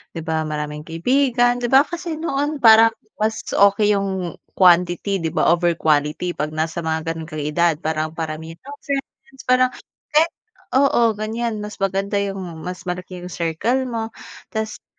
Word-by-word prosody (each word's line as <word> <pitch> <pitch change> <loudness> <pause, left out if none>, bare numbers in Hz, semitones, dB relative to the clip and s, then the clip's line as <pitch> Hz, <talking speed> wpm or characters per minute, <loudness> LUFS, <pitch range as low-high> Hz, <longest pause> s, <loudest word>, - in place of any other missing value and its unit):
'di 165 - -4
ba 160 -1 -1
maraming 150 0 -5
kaibigan, 245 +7 +2
'di 240 - -1
ba 270 +3 +6
kasi 340 0 -5
noon 295 -1 -1
parang 225 0 +8 0.3
mas 220 +1 -1
okey 200 +1 +4
'yung 190 -4 -2 0.2
quantity 180 +2 +3
'di 160 - -1
ba - - +3
over 175 0 +2
quality 150 +3 +1
'pag 150 0 -3
nasa 160 +2 -2
mga 160 0 -2
gano'n 160 -1 -6
kang 155 -1 -4
edad, 165 +2 +2
parang 155 0 -2
paramihan 160 0 -5
ng 285 +1 -9
friends 270 -1 -6
parang 255 0 +4 0.4
kahit 315 +2 +3 0.4
oo, 245 -4 +4
ganiyan. 215 +1 -3
Mas 210 0 -7
maganda 195 +1 -1
'yung 195 -1 -2 0.3
mas 180 0 -5
malaki 180 0 -5
yung 180 - -7
circle 200 +11 0
mo, 225 -2 -3 0.4
tapos 220 -1 -4
'di - - -70
195 Hz, 165 wpm, -21 LUFS, 165-240 Hz, 0.4 s, parang